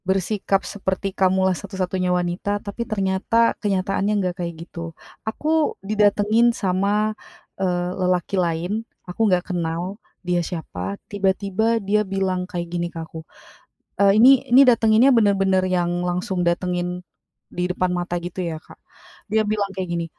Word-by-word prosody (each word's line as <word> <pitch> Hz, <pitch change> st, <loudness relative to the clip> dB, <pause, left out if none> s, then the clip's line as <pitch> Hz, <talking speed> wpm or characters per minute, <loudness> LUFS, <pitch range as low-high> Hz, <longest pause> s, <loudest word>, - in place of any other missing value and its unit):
Bersikap 195 Hz, +1 st, 0 dB
seperti 195 Hz, -1 st, -3 dB
kamulah 190 Hz, 0 st, +2 dB
satu-satunya 185 Hz, +2 st, -3 dB
wanita, 180 Hz, +3 st, 0 dB
tapi 210 Hz, +4 st, -6 dB
ternyata, 205 Hz, +3 st, +1 dB
kenyataannya 195 Hz, +1 st, 0 dB
enggak 185 Hz, -3 st, 0 dB
kayak 170 Hz, -1 st, -5 dB
gitu. 165 Hz, -1 st, -8 dB, 0.3 s
Aku 310 Hz, +6 st, 0 dB
didatengin 210 Hz, +2 st, +3 dB
sama, 200 Hz, +3 st, +1 dB, 0.5 s
eee, 180 Hz, -1 st, 0 dB
lelaki 180 Hz, 0 st, 0 dB
lain, 175 Hz, +5 st, -1 dB, 0.2 s
aku 210 Hz, +5 st, 0 dB
nggak 180 Hz, 0 st, 0 dB
kenal, 175 Hz, +4 st, -3 dB, 0.2 s
dia 175 Hz, 0 st, +1 dB
siapa, 100 Hz, -, -5 dB
tiba-tiba 200 Hz, +3 st, 0 dB
dia 210 Hz, 0 st, +1 dB
bilang 190 Hz, -2 st, -2 dB
kayak 175 Hz, -1 st, -3 dB
gini 175 Hz, 0 st, -1 dB
ke 170 Hz, -, -12 dB
aku, 160 Hz, 0 st, -9 dB, 0.7 s
eee, 200 Hz, +2 st, +4 dB
ini 260 Hz, +2 st, +7 dB
ini 265 Hz, +2 st, +7 dB
datenginnya 235 Hz, +2 st, +5 dB
bener-bener 195 Hz, -4 st, +3 dB
yang 175 Hz, -1 st, 0 dB
langsung 180 Hz, +1 st, -1 dB
datengin, 180 Hz, +1 st, -1 dB, 0.5 s
di 180 Hz, +1 st, -2 dB
depan 180 Hz, 0 st, 0 dB
mata 175 Hz, 0 st, -2 dB
gitu, 175 Hz, +2 st, -5 dB
ya, 165 Hz, -2 st, -4 dB
Kak. -, -, -16 dB, 0.6 s
Dia 220 Hz, 0 st, +2 dB
bilang 205 Hz, -1 st, 0 dB
kayak 190 Hz, -1 st, -4 dB
gini, 170 Hz, -1 st, -2 dB
190 Hz, 140 wpm, -22 LUFS, 175-205 Hz, 0.7 s, ini